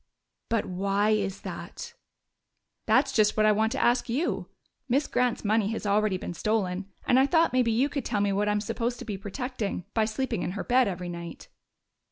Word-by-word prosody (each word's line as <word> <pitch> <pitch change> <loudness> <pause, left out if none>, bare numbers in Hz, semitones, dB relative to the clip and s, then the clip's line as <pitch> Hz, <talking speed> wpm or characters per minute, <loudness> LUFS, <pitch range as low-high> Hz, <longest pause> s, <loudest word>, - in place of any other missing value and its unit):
"But 230 -1 +1
why 200 +3 +1
is 200 -3 -1
that?" 475 - -7 0.9
"That's - - +4
just 215 -1 +3
what 215 - +4
I 215 - +6
want 220 +1 +2
to 275 - -2
ask 240 0 +2
you! 280 +9 -1 0.4
Miss 275 +4 +2
Grant's 250 -3 0
money 215 0 +2
has 220 - -5
already 205 -1 +2
been 180 - -6
stolen, 195 -1 -1 0.2
and 250 - +4
I 270 - +4
thought 330 -1 +3
maybe 250 -2 +3
you 245 +5 +2
could 285 -2 -3
tell 210 - -1
me 200 0 +1
what 205 +1 +1
I'm 210 0 +1
supposed 235 +3 -2
to - - -8
be 210 - -3
protecting 205 - -4
by 220 -1 +2
sleeping 220 -2 -2
in 180 - -2
her 200 - -4
bed 250 0 +3
every 180 -2 -4
night." 170 -1 -8
215 Hz, 200 wpm, -27 LUFS, 200-245 Hz, 0.9 s, I